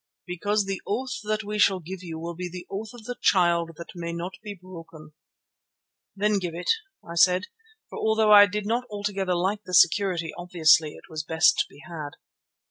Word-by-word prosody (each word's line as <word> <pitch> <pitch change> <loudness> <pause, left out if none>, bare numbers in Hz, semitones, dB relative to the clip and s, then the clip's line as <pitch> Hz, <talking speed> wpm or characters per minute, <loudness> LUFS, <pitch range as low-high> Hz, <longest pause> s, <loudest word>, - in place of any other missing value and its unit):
"Because 205 +4 -1
the 195 -1 -4
oath 255 +4 -2
that 215 +1 -1
we 210 0 -4
shall 195 -2 +4
give 180 +2 -8
you 165 -3 -7
will 170 +1 -5
be 180 +1 -5
the 180 0 -8
oath 210 +3 -5
of 240 -2 -13
the 245 +3 -6
Child 170 -3 +2
that 170 +4 -9
may 170 -2 -5
not 170 +2 -5
be 210 -2 -7
broken." 165 -4 -12 1.0
"Then 205 +1 +1
give 175 -3 -5
it," 175 - 0 0.4
I 170 - -7
said, 180 +2 +4 0.4
for - - -8
although 220 -1 +2
I 205 -1 +9
did 205 0 -4
not 235 +4 -1
altogether 200 -3 -2
like 190 +4 -1
the 180 - -2
security, 175 -2 +3
obviously 160 -3 +3
it - - -15
was 155 0 -5
the 160 - -5
best 160 - +5
to - - +2
be 140 - -16
had. 155 -4 -7
185 Hz, 200 wpm, -25 LUFS, 170-205 Hz, 1.0 s, I